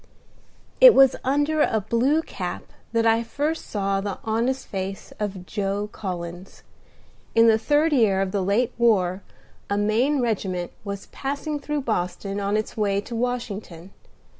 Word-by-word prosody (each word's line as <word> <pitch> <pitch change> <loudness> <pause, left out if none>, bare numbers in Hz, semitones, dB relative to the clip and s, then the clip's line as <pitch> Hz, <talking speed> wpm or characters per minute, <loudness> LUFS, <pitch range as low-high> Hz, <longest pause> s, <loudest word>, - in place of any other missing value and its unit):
I - - +10
It - - +11
was 270 -1 +6
under 290 +4 +1
a 220 - +2
blue 245 +9 +1
cap - - -5 0.3
that 230 0 +1
I 225 0 +4
first 295 +7 -3
saw 195 -1 -1
the 200 -1 -4
honest 235 +4 -1
face 195 0 -5
of 195 -3 -4
Joe 205 +1 -2
Collins. 175 -2 -7 0.7
In 230 0 +6
the 220 -1 +5
third 295 +6 +2
year 215 -8 +3
of 195 -1 -1
the 200 - 0
late 220 +6 +1
war 195 -5 +2 0.5
a 200 - 0
Maine 230 +8 +2
regiment 190 -7 -2
was 200 -1 -6
passing 285 +2 -3
through 295 +1 -2
Boston, 195 -3 -2
on 200 +1 0
its 215 - -3
way 200 -2 +1
to 230 +3 -7
Washington. 210 -7 -4
215 Hz, 155 wpm, -24 LUFS, 195-255 Hz, 0.7 s, It